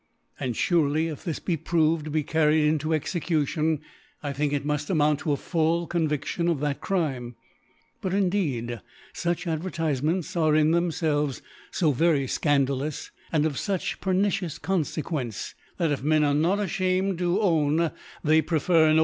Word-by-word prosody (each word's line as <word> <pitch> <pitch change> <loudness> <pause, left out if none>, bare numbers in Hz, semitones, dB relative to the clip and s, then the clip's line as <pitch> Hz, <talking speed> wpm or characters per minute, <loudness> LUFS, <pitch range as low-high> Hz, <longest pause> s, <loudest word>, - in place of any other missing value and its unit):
And 125 -3 -2
furely 160 - +2
if 150 - -8
this 165 -5 -3
be 175 - -1
proved 160 0 +1
to - - -5
be 155 0 0
carried 155 0 +3
into 155 +1 0
Execution, 155 -1 0 0.4
I 145 -1 -2
think 145 +1 0
it 145 -1 -1
muft 150 0 -1
amount 150 -4 +2
to 155 - -1
a 140 - +1
full 165 +1 0
ConviAion 160 +1 -1
of 165 -5 0
that 145 -2 -1
Crime. 135 -10 -2 0.7
But, 185 - -2
indeed, 155 - 0 0.3
fqch 175 +1 -2
Advertifements 165 -1 -1
are 155 -3 +3
in 155 0 +4
thcmfelves 160 -5 0 0.3
fo 160 -4 +2
very 145 0 +2
fcandalous, 140 +1 0 0.2
and 155 -2 +2
of 150 -4 -1
fuch 195 -4 -2
pernicious 190 -3 0
Confdquence, 155 - -2 0.2
that 165 -4 +1
if 145 - -1
Men 155 +2 +3
are 145 -1 +2
not 165 +7 +2
afliamed 185 -1 0
lo 175 +3 +2
own 160 -4 +2 0.3
they 155 +1 +4
prefer 160 0 +3
ar^. 155 - +5
155 Hz, 155 wpm, -26 LUFS, 145-170 Hz, 0.7 s, ar^